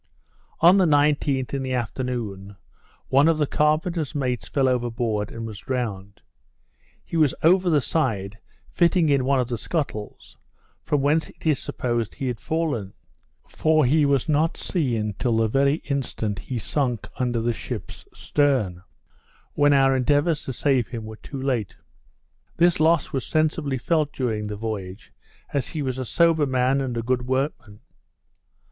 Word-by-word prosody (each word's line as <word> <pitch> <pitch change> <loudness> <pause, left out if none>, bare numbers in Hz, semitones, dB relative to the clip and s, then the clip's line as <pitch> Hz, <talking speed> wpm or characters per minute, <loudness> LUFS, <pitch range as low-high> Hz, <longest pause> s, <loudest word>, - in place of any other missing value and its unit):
On 175 +4 +7
the 190 - +4
19th, 145 -3 +2
in 135 - -1
the 130 -1 -2
afternoon, 115 -5 -4 0.5
one 140 +3 +5
of 165 -1 +3
the 150 - +2
carpenter's 155 +1 0
mates 125 -4 -2
fell 135 -2 +1
overboard, 120 -4 -1
and 115 0 -6
was 110 -3 -7
drowned. 100 -3 -4 0.8
He - - -7
was 155 -4 +3
over 180 +2 +4
the 150 -3 +3
side, 115 -8 -1 0.3
fitting 170 -2 +3
in 140 -3 +2
one 135 0 +2
of 125 - 0
the 120 -2 -4
scuttles, 135 -10 -5 0.4
from 145 -2 0
whence 150 +3 +1
it - - -18
is 155 -4 +2
supposed 120 -3 -2
he 135 - -3
had 120 -3 -4
fallen; 145 - -2 0.5
for 155 -2 +2
he 150 +5 +3
was 140 -3 +2
not 155 +1 +1
seen 115 - -1
till 120 -3 +1
the 115 0 +3
very 140 +5 +2
instant 115 -7 -2
he 130 - -5
sunk 125 0 -1
under 120 -2 0
the 120 +1 0
ship's - - -7
stern, 130 -12 0 0.7
when 145 0 +3
our 135 -1 +4
endeavours 145 +4 +1
to - - -3
save 130 -2 +1
him 115 -3 -6
were 110 0 -9
too 140 - -8
late. 125 -7 -2 0.8
This 175 -1 +3
loss 160 0 +2
was 135 - -1
sensibly 155 -3 0
felt 155 +3 0
during 110 -6 -2
the 105 - -4
voyage, 100 -3 -6 0.4
as 140 -2 0
he 155 -3 -4
was 130 -1 -3
a 130 - -3
sober 165 +2 +3
man 130 +1 +1
and 125 -3 -3
a 115 - -2
good 125 +1 -1
workman. 130 -5 -2
130 Hz, 160 wpm, -24 LUFS, 115-150 Hz, 0.8 s, On